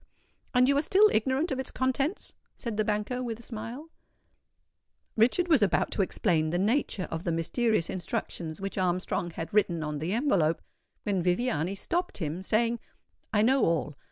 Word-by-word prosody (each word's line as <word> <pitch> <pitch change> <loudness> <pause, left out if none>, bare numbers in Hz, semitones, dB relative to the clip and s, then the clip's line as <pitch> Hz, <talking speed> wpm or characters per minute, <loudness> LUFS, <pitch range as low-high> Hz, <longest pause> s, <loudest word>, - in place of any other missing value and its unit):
"And 250 0 +6
you 280 - +4
are - - +2
still 405 +6 +5
ignorant 265 +9 +1
of 265 - -1
its 265 - -3
contents?" 270 +7 -1 0.2
said 235 -4 -4
the 215 - +1
banker, 210 +4 -1
with 235 -3 -4
a - - -12
smile. 235 +8 -7 1.2
Richard 250 +11 +3
was 310 -8 +4
about 200 -4 +2
to - - +1
explain 170 -4 +1
the 175 - 0
nature 205 -1 0
of 165 +1 -3
the 170 - -1
mysterious 170 +4 +1
instructions 170 -2 -4
which 195 0 -4
Armstrong 180 -1 0
had 165 +1 -6
written 175 -6 +2
on 150 -1 -3
the 165 +6 -2
envelope, 195 - +2 0.4
when 195 -3 0
Viviani 180 -1 0
stopped 350 - -2
him, 165 0 -3
saying, 230 +4 +1 0.5
"I 210 -1 +3
know 265 +3 +4
all. 160 -3 +1
210 Hz, 170 wpm, -28 LUFS, 175-255 Hz, 1.2 s, And